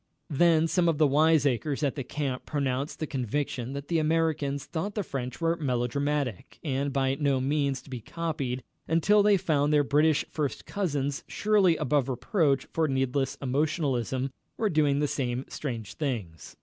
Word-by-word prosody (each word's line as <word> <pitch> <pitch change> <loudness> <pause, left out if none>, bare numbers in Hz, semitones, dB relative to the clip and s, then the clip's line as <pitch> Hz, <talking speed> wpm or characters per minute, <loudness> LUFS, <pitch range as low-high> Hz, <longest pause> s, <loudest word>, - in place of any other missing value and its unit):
Then 165 +2 +4
some 170 0 +2
of 160 - +1
the 155 - +5
wiseacres 145 -1 +2
at 140 - +1
the 140 - -4
camp 135 -1 -4
pronounced 140 -1 -1
the 160 - -2
conviction 130 -1 -3
that 140 0 -6
the 165 -1 +1
Americans 155 -3 0
thought 190 +5 -4
the 210 - -1
French 130 -6 -5
were 165 0 +1
melodramatic, 135 - -1
and 140 -2 -1
by 135 -1 +1
no 140 -1 +1
means 140 0 0
to - - -16
be 125 - -4
copied, 140 -4 -3 0.2
until 180 +6 +4
they 205 -1 +5
found 150 -5 +1
their 150 -1 +4
British 150 +2 +3
first 150 -3 -3
cousins, 145 -8 -2
surely 200 -6 +3
above 145 -2 +1
reproach 135 - +1
for 160 -1 +2
needless 135 0 0
emotionalism, 135 -2 0 0.3
were 215 -2 +1
doing 150 -3 +3
the 145 0 +1
same 125 -2 -2
strange 115 -8 -5
things. 115 - -4
145 Hz, 160 wpm, -28 LUFS, 130-160 Hz, 0.3 s, the